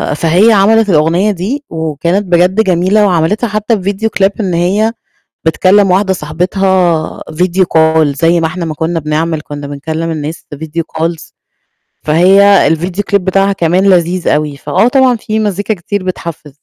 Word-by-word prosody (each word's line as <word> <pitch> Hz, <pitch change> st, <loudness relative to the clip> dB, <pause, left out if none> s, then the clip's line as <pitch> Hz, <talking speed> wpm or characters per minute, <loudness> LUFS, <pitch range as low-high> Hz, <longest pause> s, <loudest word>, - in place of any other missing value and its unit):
فهي 175 Hz, +9 st, +3 dB
عملت 210 Hz, +2 st, +3 dB
الأغنية 170 Hz, +6 st, +2 dB
دي، 215 Hz, +11 st, -4 dB
وكانت 160 Hz, +5 st, -2 dB
بجد 180 Hz, +4 st, +2 dB
جميلة، 185 Hz, +3 st, +2 dB
وعملتها 185 Hz, +5 st, 0 dB
حتى 215 Hz, 0 st, -1 dB
في 195 Hz, -, -1 dB
Video 220 Hz, +3 st, -2 dB, 0.2 s
Clip 195 Hz, -, +3 dB
إن 185 Hz, -4 st, -2 dB
هي 200 Hz, +7 st, 0 dB, 0.5 s
بتكلِّم 185 Hz, +4 st, +3 dB
واحدة 190 Hz, +1 st, +2 dB
صاحبتها 175 Hz, +1 st, -1 dB
Video 180 Hz, +3 st, 0 dB, 0.2 s
Call 160 Hz, 0 st, +3 dB
زي 165 Hz, +3 st, +2 dB
ما 160 Hz, -, 0 dB
إحنا 175 Hz, +2 st, -5 dB
ما 155 Hz, -2 st, -4 dB
كُنّا 165 Hz, +2 st, -2 dB
بنعمِل، 155 Hz, +1 st, -2 dB
كُنّا 145 Hz, -1 st, -8 dB
بنكلِّم 160 Hz, +4 st, -4 dB
الناس 155 Hz, +1 st, -6 dB
Video 160 Hz, +2 st, -4 dB, 0.2 s
Calls 165 Hz, 0 st, -3 dB, 0.7 s
فهي 190 Hz, +3 st, +4 dB
الVideo 180 Hz, +4 st, -4 dB
Clip -, -, +5 dB
بتاعها 195 Hz, +1 st, +1 dB
كمان 180 Hz, +1 st, 0 dB
لذيذ 175 Hz, 0 st, +1 dB
أوي، 150 Hz, -1 st, -1 dB
فآه 195 Hz, -, +1 dB
طبعًا 260 Hz, -1 st, +3 dB
في 215 Hz, 0 st, -3 dB
مزيكا 205 Hz, +1 st, -1 dB
كتير 190 Hz, +2 st, -5 dB
بتحفِز. 170 Hz, -4 st, -6 dB
180 Hz, 155 wpm, -12 LUFS, 160-200 Hz, 0.7 s, Clip